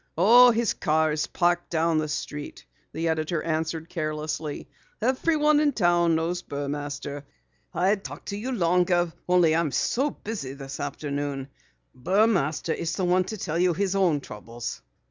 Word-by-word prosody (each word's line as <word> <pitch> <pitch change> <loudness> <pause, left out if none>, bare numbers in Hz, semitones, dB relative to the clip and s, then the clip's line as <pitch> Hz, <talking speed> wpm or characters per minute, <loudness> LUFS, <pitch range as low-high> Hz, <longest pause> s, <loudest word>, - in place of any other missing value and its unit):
"Oh, 240 +8 +8
his 235 -1 +1
car 155 -2 +1
is 150 0 -1
parked 175 0 0
down 165 -1 +1
the 155 - -1
street," 150 0 -6 0.3
the 165 +1 -2
editor 160 0 -1
answered 160 0 -2
carelessly. 155 -2 -4 0.3
"Everyone 300 +5 +2
in 295 -1 +2
town 175 -5 +3
knows 170 +2 -1
Burmaster. 145 -1 -5 0.5
I'd 190 +3 +1
talk - - -8
to 200 - -4
you 230 +6 -4
longer 175 -4 +2 0.2
only 175 -3 +4
I'm 165 -3 +1
so 270 - +1
busy 200 - -6
this 135 -1 -8
afternoon. 140 -1 -4 0.4
Burmaster 175 - +1
is 170 - -3
the 190 - -1
one 180 +1 +3
to 215 +3 -5
tell 170 -3 -2
you 180 -1 +3
his 195 +1 0
own 175 -7 +2
troubles." 120 -2 -7
170 Hz, 150 wpm, -26 LUFS, 150-190 Hz, 0.5 s, Oh